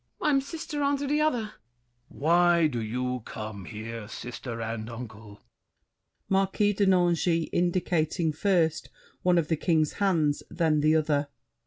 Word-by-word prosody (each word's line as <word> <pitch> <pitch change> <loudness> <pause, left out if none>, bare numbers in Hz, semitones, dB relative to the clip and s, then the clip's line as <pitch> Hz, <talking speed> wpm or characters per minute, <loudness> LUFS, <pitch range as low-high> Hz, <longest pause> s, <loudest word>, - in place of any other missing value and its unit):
MARION. 295 -2 +3
I'm - - +2
sister 300 0 -5
Unto 285 0 +1
the 295 +2 +1
other! 305 -6 +2
THE 215 - -5
KING. 120 - -23
Why 170 +1 +4
do 125 -6 -1
you 125 +3 -2
come 105 -4 -7
here, 110 0 -7
Sister 120 +1 -7
and 115 0 -4
uncle? 110 -3 -10 0.8
MARQUIS 195 +1 +1
DE 205 - +3
NANGIS 175 -2 +2
(indicating 175 -2 0
first 165 -2 +1 0.3
one 180 -1 +3
of 165 -3 +1
The 160 - 0
King's 155 -2 +1
hands, 160 -7 +2
then 160 -3 +1
the 155 +2 +3
other). 150 -2 +1
160 Hz, 150 wpm, -27 LUFS, 120-185 Hz, 0.8 s, Why